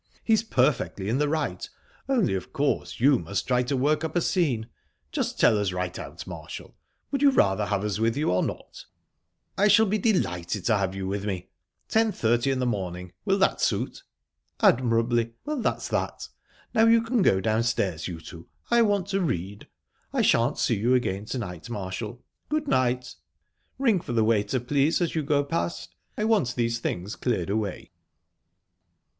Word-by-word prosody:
He's 220 -2 +3
perfectly 130 - 0
in 125 +5 +1
the 150 0 +2
right, 155 -1 -2 0.4
only, 240 - +2
of 95 -1 -4
course, 145 0 -1
you 135 +1 +5
must 100 - -3
try 125 -1 +2
to 125 +2 -1
work 150 +5 +1
up 160 0 -4
a 175 - +3
scene. 140 - 0 0.4
Just - - -2
tell 105 - +5
us 100 -2 0
right 90 -1 -3
out, - - -8
Marshall - - -9 0.4
would 275 - -1
you 285 - +7
rather 105 - +2
have 100 -1 -1
us 105 0 -2
with 115 +3 +1
you, 150 - +1
or 90 - +2
not?" - - -6 0.7
"I 205 - +5
shall 210 +2 +6
be 210 +1 0
delighted 95 - 0
to 110 - +3
have 95 -1 -1
you 95 -1 -4
with 100 +1 -2
me...10.30 110 - -1
in 135 - 0
the 130 - 0
morning 90 -6 -3
will - - +2
that - - +2
suit?" - - -1 0.6
"Admirably. 115 -1 +2
Well, 300 -3 -2
that's - - -1
that. - - -2 0.4
Now 225 +1 +5
you 230 0 +5
can 230 0 +1
go 95 - +4
downstairs, 110 -5 0
you 85 -3 -6
two. 85 -1 -11 0.2
I 235 0 +5
want 205 -4 +2
to 195 0 0
read. 100 - -3 0.4
I - - +1
shan't - - +3
see - - +1
you 120 +4 +3
again 100 -5 -1
to 130 - -4
night, 90 -5 -6
Marshall...Good 120 - -5
night!...Ring 130 - -2
for 125 - -5
the 115 -2 +3
waiter, 110 +2 +1
please, 140 +5 +1
as 175 -2 0
you 160 - 0
go 145 0 +1
past. 85 -8 -3 0.2
I 210 - -1
want 210 - +2
these 115 -1 0
things 100 -2 -3
cleared 100 -7 -1
away." 105 -3 -3
120 Hz, 175 wpm, -26 LUFS, 100-160 Hz, 0.7 s, you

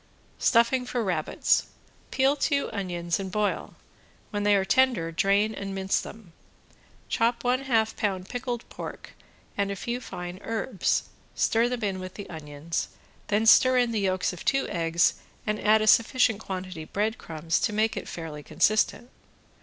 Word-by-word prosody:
~STUFFING 235 +2 +3
FOR 240 -2 -1
RABBITS~ 175 -6 +1 0.4
Peel 270 +2 +2
two 280 -1 0
onions 175 -4 -2
and 190 -1 -5
boil, 210 +1 -1 0.6
when 205 - -2
they 205 0 +4
are 195 -1 +2
tender 245 -9 +2
drain 200 +5 +2
and 195 -2 -5
mince 190 0 0
them. 205 -6 -11 0.7
Chop 235 +1 +1
one 250 +1 +2
half 225 -4 +1
pound 190 -3 -2
pickled 245 -1 -4
pork - - -8 0.4
and 200 0 -1
few 240 +5 -3
fine 180 -5 -7
herbs, 225 -3 -1 0.3
stir 230 +2 +2
them 245 -2 -3
in 195 -2 -1
with 185 0 -8
the 205 - -7
onions, 155 0 -4 0.4
then 210 +2 +1
stir 255 +3 +7
in 245 -1 +3
the 220 - 0
yolks 185 -1 0
of 180 - -9
two 270 0 +1
eggs 165 0 +2 0.3
and 210 0 -1
add 215 +1 +4
a - - +1
sufficient 230 0 +4
quantity 185 -5 -6
breadcrumbs 170 -6 -2
to - - 0
make 215 +1 +1
it - - -5
fairly 160 -3 -6
consistent. 215 - +1
205 Hz, 155 wpm, -27 LUFS, 185-235 Hz, 0.7 s, stir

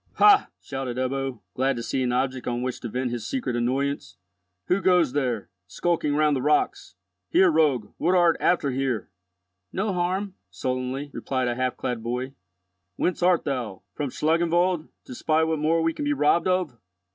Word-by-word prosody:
"Ha!" 410 -1 +6
shouted 135 -3 -5
Ebbo, 130 -2 -2
glad 135 +1 +1
to 120 - -4
see 130 - -1
an 125 -1 +1
object 130 +1 -1
on 120 0 -1
which 130 -1 -3
to 120 - -5
vent 125 +2 -2
his 120 -3 -4
secret 245 - -2
annoyance. 130 0 -1 0.5
"Who 185 +2 +1
goes 180 -8 +3
there, 125 -9 -1 0.2
skulking 150 - 0
round 150 -1 +3
the 130 - -1
rocks? 150 -9 0 0.3
Here, 185 -2 +5
rogue, 145 -9 +2
what 180 +3 +2
art 175 -2 +5
after 160 -6 +2
here?" 130 -6 -2 0.6
"No 195 +1 -1
harm," 185 +2 -1 0.2
sullenly 130 +7 -3
replied 130 -2 -2
a - - 0
half 130 +1 -1
clad 125 -3 -3
boy. 125 +3 -3 0.6
"Whence 180 - -1
art 180 -1 +4
thou? 120 -9 -3
From 145 -2 -3
Schlangenwald, 170 +3 +1 0.2
to - - -8
spy 155 +5 +1
what 160 -1 0
more 160 +2 +2
we 165 0 +1
can 295 - -4
be 290 - +2
robbed 170 - +2
of? 180 -10 0
140 Hz, 175 wpm, -25 LUFS, 125-170 Hz, 0.6 s, Ha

